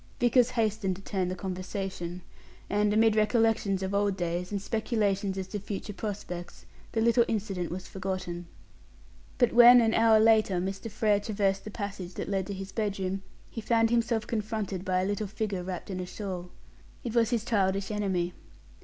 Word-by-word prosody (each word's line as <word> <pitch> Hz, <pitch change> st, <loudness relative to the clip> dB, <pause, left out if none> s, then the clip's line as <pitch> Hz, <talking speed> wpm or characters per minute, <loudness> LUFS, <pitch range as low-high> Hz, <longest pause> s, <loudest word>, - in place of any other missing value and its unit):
Vickers 245 Hz, 0 st, +4 dB
hastened 215 Hz, -4 st, 0 dB
to 190 Hz, -, -12 dB
turn 190 Hz, -3 st, -1 dB
the 185 Hz, -, -3 dB
conversation, 185 Hz, -1 st, -5 dB, 0.5 s
and, 205 Hz, 0 st, +2 dB
amid 220 Hz, 0 st, +4 dB
recollections 215 Hz, -3 st, +2 dB
of 190 Hz, +1 st, -2 dB
old 200 Hz, -1 st, +1 dB
days, 175 Hz, +1 st, -2 dB
and 200 Hz, -, -1 dB
speculations 200 Hz, -2 st, -1 dB
as 190 Hz, -, -2 dB
to 205 Hz, -, -3 dB
future 205 Hz, +1 st, -5 dB
prospects, 190 Hz, -4 st, -6 dB, 0.3 s
the 225 Hz, -, +1 dB
little 235 Hz, +1 st, +5 dB
incident 195 Hz, -5 st, -2 dB
was 180 Hz, +2 st, -6 dB
forgotten. 185 Hz, -2 st, -4 dB, 0.9 s
But 245 Hz, -3 st, +3 dB
when, 240 Hz, +1 st, +9 dB
an 225 Hz, -1 st, +3 dB
hour 225 Hz, -1 st, +5 dB
later, 220 Hz, -3 st, +4 dB
Mr. 195 Hz, +4 st, -4 dB
Frere 210 Hz, -1 st, +2 dB
traversed 200 Hz, -2 st, -1 dB
the -, -, -5 dB
passage 195 Hz, -4 st, -6 dB
that -, -, -4 dB
led 195 Hz, -2 st, -1 dB
to 200 Hz, -, -4 dB
his 195 Hz, 0 st, -7 dB
bedroom, 195 Hz, -3 st, -2 dB, 0.3 s
he 225 Hz, -, -5 dB
found 225 Hz, 0 st, +2 dB
himself 230 Hz, -2 st, +1 dB
confronted 215 Hz, -4 st, -3 dB
by 185 Hz, -1 st, +1 dB
a -, -, 0 dB
little 205 Hz, +1 st, -1 dB
figure 205 Hz, -2 st, -3 dB
wrapped 185 Hz, +2 st, -5 dB
in 185 Hz, -, -3 dB
a 180 Hz, -, -4 dB
shawl. 180 Hz, -3 st, -5 dB, 0.5 s
It 235 Hz, -4 st, -4 dB
was 230 Hz, -2 st, +3 dB
his 235 Hz, -3 st, 0 dB
childish 195 Hz, -3 st, +1 dB
enemy. 190 Hz, -4 st, -1 dB
200 Hz, 175 wpm, -29 LUFS, 190-220 Hz, 0.9 s, when